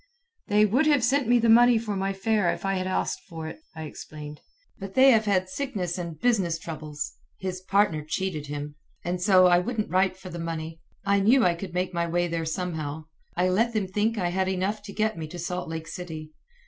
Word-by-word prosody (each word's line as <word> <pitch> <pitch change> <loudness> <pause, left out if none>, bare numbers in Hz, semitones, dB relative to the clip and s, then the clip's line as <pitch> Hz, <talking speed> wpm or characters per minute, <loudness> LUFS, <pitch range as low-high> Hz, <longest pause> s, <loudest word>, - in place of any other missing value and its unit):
"They 210 0 +4
would 255 +9 +2
have 290 -5 +4
sent 270 +1 +2
me 245 +1 +5
the 235 0 +2
money 240 +1 +7
for 220 -2 -3
my 195 0 -1
fare 195 -2 +1
if - - -5
I 195 - +1
had 185 -1 -1
asked 185 - -1
for 160 -1 -6
it," 160 - -8 0.2
I 160 - -6
explained, 150 0 -9 0.4
"but 195 -1 -7
they 265 +1 +7
have 220 -2 +4
had 185 -3 +2
sickness 185 -6 -3
and 170 -3 -6
business 195 -8 +2
troubles. 155 -2 -6 0.3
His 185 -1 -4
partner 195 -4 +2
cheated 155 -1 -3
him. 145 0 -5 0.3
And 175 +1 -2
so 185 -1 +6
I 175 -1 +6
wouldn't 215 +2 -2
write 185 0 +2
for 185 0 -10
the 170 - -6
money. 165 -1 -5 0.2
I 200 0 +3
knew 230 +6 +5
I 175 - +4
could 175 +1 -7
make 180 0 -1
my 170 0 0
way 175 +1 +1
there 165 -1 -2
somehow. 160 -3 -3 0.3
I 180 +1 +3
let 230 +6 +2
them 210 -3 0
think 210 +4 0
I 180 -3 0
had 190 +1 0
enough 190 +3 -1
to 200 - -7
get 215 -3 -1
me 160 - -4
to 175 +3 -9
Salt 180 +1 -4
Lake 160 -1 -5
City. 155 -2 -7
185 Hz, 220 wpm, -26 LUFS, 165-210 Hz, 0.4 s, money